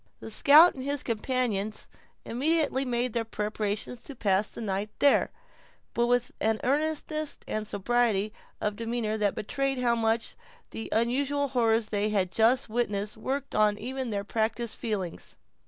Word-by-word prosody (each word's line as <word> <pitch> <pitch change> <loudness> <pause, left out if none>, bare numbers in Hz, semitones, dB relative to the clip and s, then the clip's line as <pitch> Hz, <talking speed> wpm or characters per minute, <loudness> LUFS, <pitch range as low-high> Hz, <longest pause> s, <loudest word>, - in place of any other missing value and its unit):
The 225 - -8
scout 300 +10 +7
and 260 - -7
his 280 0 -2
companions 220 -3 -1 0.4
immediately 275 +1 +1
made 245 -1 -1
their 230 - 0
preparations 215 +1 -3
to 280 - -7
pass 205 -2 +1
the - - -9
night 205 -1 -2
there; 285 - +4 0.6
but 235 0 +1
with 245 0 +5
an 220 0 +1
earnestness 305 +2 -1
and 215 0 -2
sobriety 215 -1 +1 0.3
of 210 -1 -1
demeanor 230 -1 -2
that 205 -2 +1
betrayed 275 +5 -2
how 245 -1 +2
much 225 0 0 0.4
the 225 - -6
unusual 275 +5 +1
horrors 230 -3 +2
they 210 0 0
had 190 -4 0
just 230 +6 +3
witnessed 215 -3 -2
worked 270 +5 -4
on 210 -1 +3
even 260 +3 -4
their 200 -2 -2
practised 225 +2 -2
feelings. 200 -7 -4
230 Hz, 150 wpm, -28 LUFS, 215-260 Hz, 0.6 s, scout